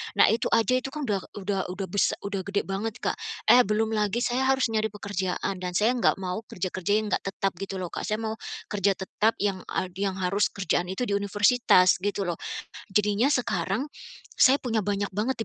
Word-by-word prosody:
Nah, - - +6
itu 230 - +1
aja 230 +2 +3
itu 255 - -6
kan 305 -1 -4
udah 205 -3 +1 0.2
udah 195 -1 -1
udah 190 +1 -4
bes 200 - +2
udah 200 -1 -3
gede 200 +1 -1
banget, 205 +3 -3
Kak, - - 0 0.4
eh 250 - +8
belum 220 +1 +1
lagi 210 +2 +1
saya 255 +2 +1
harus 265 -2 +2
nyari 220 0 +1
pekerjaan 195 -2 -3
dan 180 -1 -4
saya 215 +5 +4
enggak 245 - +3
mau 185 +1 -3
kerja-kerja 185 +1 -3
yang 215 - -3
enggak - - 0
tetap 195 0 -1
gitu 195 0 -5
loh, 180 - -5
Kak. - - -4
Saya 215 0 -1
mau 220 0 -2 0.4
kerja 200 -1 +2
tetap 210 +4 0
yang 195 -2 0
ad 185 - -2
yang 195 -1 0
harus 195 +3 +2
kerjaan 185 -2 0
itu 190 +6 -2
di - - -3
universitas 205 -2 +4
gitu 200 +1 -1
loh. 175 - -3 0.5
Jadinya 210 +6 +2
sekarang 235 - -1 0.5
saya 270 0 +7
punya 230 -3 0
banyak 200 0 -1
banget 220 +7 -1
205 Hz, 200 wpm, -26 LUFS, 190-225 Hz, 0.5 s, eh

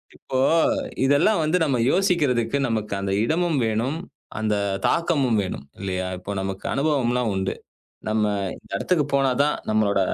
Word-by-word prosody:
இப்போ 130 -1 -3 0.7
இதெல்லாம் 145 +8 +3
வந்து 155 +4 +2
நம்ம 135 -4 +1
யோசிக்கறதுக்கு 145 - +1
நமக்கு 110 -3 -2
அந்த 100 0 -2
இடமும் 165 +2 +1
வேணும், 115 +7 -1 0.4
அந்த 110 -1 0 0.3
தாக்கமும் 140 -10 +2
வேணும் 90 -6 -6 0.2
இல்லையா? 95 -1 -2
இப்போ 95 - -7
நமக்கு 95 0 -5
அனுபவம்லாம் 125 -5 +1
உண்டு. 95 0 -1 0.5
நம்ம 110 0 +1 0.5
எடத்துக்குப் 150 -6 0
போனாதான் 140 +2 +2 0.2
நம்மளோட 105 -2 +2
125 Hz, 125 wpm, -23 LUFS, 105-150 Hz, 0.7 s, இதெல்லாம்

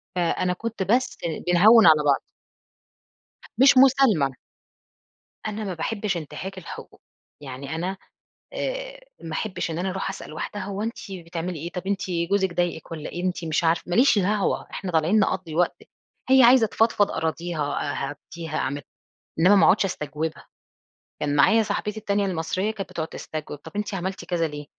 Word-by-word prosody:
فأنا 180 +1 +1
كنت 225 +1 -4
بس 240 +7 +1 0.3
بنهوّن 210 +6 +7
على 155 -2 +6
بعْض. 140 -2 +3 1.4
مش 265 +2 +6
مسالمة. 255 - +5 1.1
أنا 215 0 -4
ما 195 -3 -3
باحبش 200 +2 -2
إنتهاك 185 +5 -7
الحقوق، 185 - -10 0.4
يعني 140 +2 -6
أنا 185 +4 -3 0.6
آآ - - -4 0.2
ما 160 - -6
أحبّش 185 -1 -3
إن 165 - -3
أنا 190 +2 -1
أرُوح 190 +1 -3
أسأل 195 - -8
واحدة 205 +6 -5
هو 200 +1 -4
أنتِ 230 +3 -3 0.2
بتعملي 170 -1 -5
إيه؟ 170 +3 -6
طَب 180 +1 -6
أنتِ 200 -1 0 0.3
جوزِك 190 -2 +1
ضايقِك 175 -2 -2
والّا 155 -2 -5
إيه؟ 175 - -5
أنتِ 180 -2 -2
مش 160 +1 0
عارف 165 0 +1
ما 175 - -1
ليش 245 -3 +5
دعوة، 200 +1 0
إحنا 190 -2 -5
طالعين 165 +6 +3
نقضّي 185 -5 -1
وقت، 175 +1 0 0.5
هي 265 -1 +7
عايزة 240 -1 +7
تفضفض 210 -2 +2
،أراضيها، 160 -2 -2 0.2
أهدّيها، 155 +2 -7
أعمل، 140 +2 -2 0.6
إنما 185 +5 +6
ما 195 - +5
اقعُدش 200 - +4
أستجوبها، 155 -3 -4 0.8
كان 145 -1 0
معايا 220 +11 +5
صاحبتي 210 0 -3
التانية 200 -1 0
المصرية 185 +3 -1
كانت 210 -3 -5
بتقعد 160 -1 -4
تستجوب، 155 -1 -7
طَب 160 +3 -12
أنتِ 210 0 -2
عملتِ 190 0 -4
كذا 170 -2 0
ليه؟ 150 -1 -8
180 Hz, 160 wpm, -24 LUFS, 160-205 Hz, 1.4 s, بنهوّن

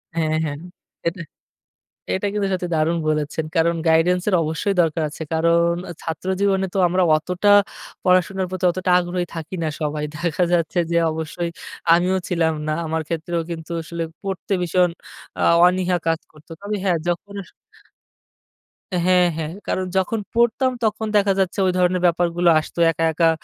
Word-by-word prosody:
হ্যাঁ, 155 -1 0
হ্যাঁ। 145 -1 -4 0.5
এটা 170 +1 -2 0.9
এটা 190 - -1
কিন্তু 205 -1 0
সত্যি 180 -1 -2
দারুণ 160 +2 +1
বলেছেন। 150 +1 -1
কারণ 170 0 +3
গাইডেন্সের 180 +4 +3
অবশ্যই 160 +6 -1
দরকার 160 -1 0
আছে। 160 - -7
কারণ 170 +1 +3 0.3
ছাত্র 165 +3 -5
জীবনে 195 -1 +2
তো - - -2
আমরা 185 +1 +1
অতটা 180 +6 0 0.5
পড়াশোনার 185 +1 +2
প্রতি 185 0 -3
অতটা 185 0 -1
আগ্রহী 175 0 -2
থাকি 165 +3 -6
না 155 - 0
সবাই। 150 0 -2
দেখা 170 +2 0
যাচ্ছে 170 +1 +1
যে - - 0 0.2
অবশ্যই 160 +2 -4 0.4
আমিও 180 +2 +2
ছিলাম 165 -2 +1
না। - - 0
আমার 160 0 -1
ক্ষেত্রেও 170 +1 -2
কিন্তু 165 0 -7
আসলে 170 +1 -5 0.2
পড়তে 195 0 -3
ভীষণ 180 +1 +2 0.5
আ - - -1 0.2
অনীহা 180 0 +2
কাজ 165 -1 +1
করত। 155 0 -20
তবে 205 +1 -3
হ্যাঁ, 180 -3 +2
যখন 175 +4 -3
আসলে - - -20 1.5
হ্যাঁ, 180 -1 +4
হ্যাঁ। 160 -1 -3 0.2
কারণ 185 - -1
যখন 210 +4 0
পড়তাম, 235 +3 +2
তখন 220 0 -1
দেখা 200 -1 +3
যাচ্ছে, 190 0 0
ওই - - +3
ধরনের 180 0 +2
ব্যাপারগুলো 175 0 +2
আসত। 155 - -9 0.2
একা, 165 +1 -1
একা 165 +1 +3
175 Hz, 155 wpm, -21 LUFS, 160-185 Hz, 1.5 s, হ্যাঁ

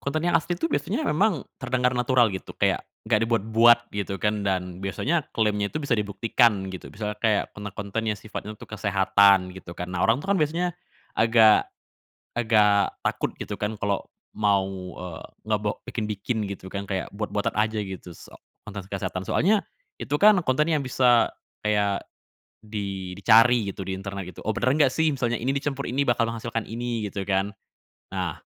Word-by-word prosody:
Konten 155 +3 -2
yang 175 - +4
asli 175 +3 -3
itu 165 -1 -2
biasanya 145 0 -1
memang 160 0 +2 0.2
terdengar 125 -1 +1
natural 125 -2 +3
gitu 95 - -7
kayak - - +1 0.2
nggak 110 -1 +3
dibuat-buat 115 +1 +4
gitu 100 -1 -3
kan 105 -1 0
dan 90 -1 -1
biasanya 145 - -1
klaimnya 105 -2 +1
itu 155 0 -4
bisa 140 - -1
dibuktikan 105 -1 +2
gitu. 95 - -8
Misalnya 105 0 -5
kayak 110 -2 +2
konten-konten 105 +2 -5
yang 105 - 0
sifatnya 110 0 -7
untuk - - -13
kesehatan 100 -2 +4
gitu 90 -2 -10
kan. 90 0 -6
Nah, 90 - -3
orang 115 +6 +2
tuh 195 - -4
kan 195 - +1
biasanya 170 +3 +1 0.5
agak 110 -1 +6 0.7
agak 105 -3 +4
takut - - -1
gitu - - -4
kan 105 0 -3
kalau 100 -1 0 0.3
mau, 100 -2 +2 0.3
eee, 90 -3 -7 0.2
ngebe 105 -1 0 0.2
bikin-bikin 105 +1 -3
gitu 100 -1 -7
kan 100 +1 -4
kayak 95 -1 -3
buat-buatan 105 +1 -2
aja 110 0 +1
gitu 95 -2 -7
se - - -14 0.4
konten 100 -2 -6
kesehatan. 95 -1 -4
Soalnya 200 - +2 0.3
itu - - -5
kan 210 0 +7
kontennya 150 +5 +2
yang 140 - -3
bisa 125 -2 +4 0.3
kayak 100 -2 +1 0.6
di 100 -4 -5
dicari 115 0 +5
gitu - - -8
di 95 - -2
internet 95 -1 -6
gitu, - - -11
"Oh, 110 - 0
benar 130 +3 +2
nggak 145 -4 +4
sih 160 +4 +1
misalnya 120 -4 -1
ini 130 +4 0
dicampur 140 0 -2
ini 135 +4 +1
bakal 120 -3 +2
menghasilkan 115 -1 -4
ini?" 115 -2 -3
Gitu 100 0 -4
kan. 95 +1 0 0.6
Nah, 90 -5 -2
110 Hz, 170 wpm, -25 LUFS, 100-125 Hz, 0.7 s, kan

